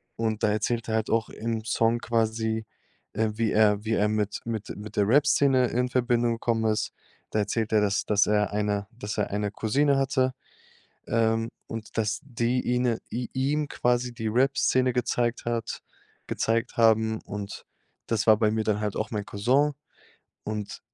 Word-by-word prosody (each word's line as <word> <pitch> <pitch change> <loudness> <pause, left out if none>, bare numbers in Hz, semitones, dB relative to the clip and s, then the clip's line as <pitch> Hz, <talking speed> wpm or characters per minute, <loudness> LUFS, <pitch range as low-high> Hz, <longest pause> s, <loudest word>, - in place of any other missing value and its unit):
Und 110 -1 -2
da 105 - +4
erzählt 115 +2 -1
er 110 - +1
halt 110 0 -1
auch 115 -1 +1
im 115 -1 -3
Song 115 +2 +2
quasi, 110 -1 0 0.5
äh, 110 -1 +1
wie 110 0 0
er 105 -1 +3
wie 110 0 -1
er 105 -1 +2
mit 105 -1 -1
mit 110 -3 -4
mit 105 +1 -9
der 100 - +3
Rapszene 140 -1 +4
in 125 +1 0
Verbindung 120 -2 +1
gekommen 115 -1 0
ist. 105 - -1 0.4
Da 105 - +1
erzählt 110 +2 -1
er, 105 - +5
dass 100 0 +1
dass 105 -1 +3
er 105 -1 +2
eine 105 -1 -1
dass 105 -2 -4
er - - 0
eine 105 0 -1
Cousine 140 +7 +2
hatte, 130 -1 +1 0.7
ähm, 115 0 +1 0.2
und 115 -1 -7
dass 105 -1 0
die 120 -1 0
ihne 125 -2 +1
i 120 0 -3
ihm 145 +3 0
quasi 125 0 0
die 110 -2 -3
Rapszene 130 0 +2
gezeigt 120 -1 0
hat 115 -1 -3 0.5
gezeigt 115 +2 -1
haben. 110 -1 +3
Und, 100 0 -7 0.4
das 110 -1 0
war 110 - +8
bei 110 -2 +3
mir 110 0 0
dann 105 -1 0
halt 105 -2 -2
auch 110 - -2
mein 105 -1 -3
Cousin. 130 +8 +2 0.7
Und, 105 -1 -5
115 Hz, 170 wpm, -26 LUFS, 105-120 Hz, 0.7 s, war